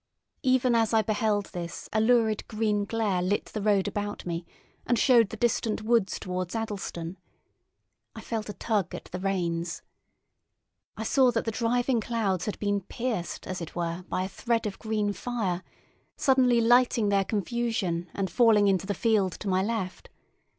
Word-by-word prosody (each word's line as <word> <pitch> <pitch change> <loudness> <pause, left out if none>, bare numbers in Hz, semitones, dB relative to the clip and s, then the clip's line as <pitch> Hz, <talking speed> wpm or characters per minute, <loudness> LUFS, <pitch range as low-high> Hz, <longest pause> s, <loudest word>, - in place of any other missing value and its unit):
Even 255 -2 +3
as 225 -1 +2
I 220 - +4
beheld 210 -1 0
this 170 -1 -6
a 215 - +3
lurid 220 -2 +2
green 215 -2 0
glare 205 -4 0
lit 190 +3 0
the 215 - -3
road 200 -2 +2
about 205 0 -4
me 170 -1 -4 0.4
and 240 - +1
showed 235 -4 +5
the 220 - -7
distant 225 -1 0
woods 225 -4 +2
towards 185 +1 -4
Addlestone. 195 -5 -4 1.0
I - - -7
felt 220 -2 -4
a - - -4
tug 205 -6 -1
at - - -7
the 180 - -4
reins. 175 -3 -2 1.1
I 220 - -3
saw 255 +3 +4
that 230 -2 -1
the 225 - 0
driving 240 +1 +1
clouds 205 -5 -1
had 210 - -2
been 205 -1 0
pierced 220 -2 -4
as 185 -1 -4
it 165 - -7
were 170 0 -2
by 185 - -1
a - - -2
thread 230 +4 -1
of 205 -2 -4
green 215 -2 -1
fire, 200 -7 -2 0.6
suddenly 255 -3 +4
lighting 240 -2 +4
their 200 -1 +3
confusion 200 -4 -1
and 195 -1 0
falling 225 -4 +5
into 190 -1 +1
the 205 - -1
field 205 -4 +2
to - - -7
my 185 -1 +2
left. 200 -3 -3
210 Hz, 170 wpm, -27 LUFS, 190-230 Hz, 1.1 s, showed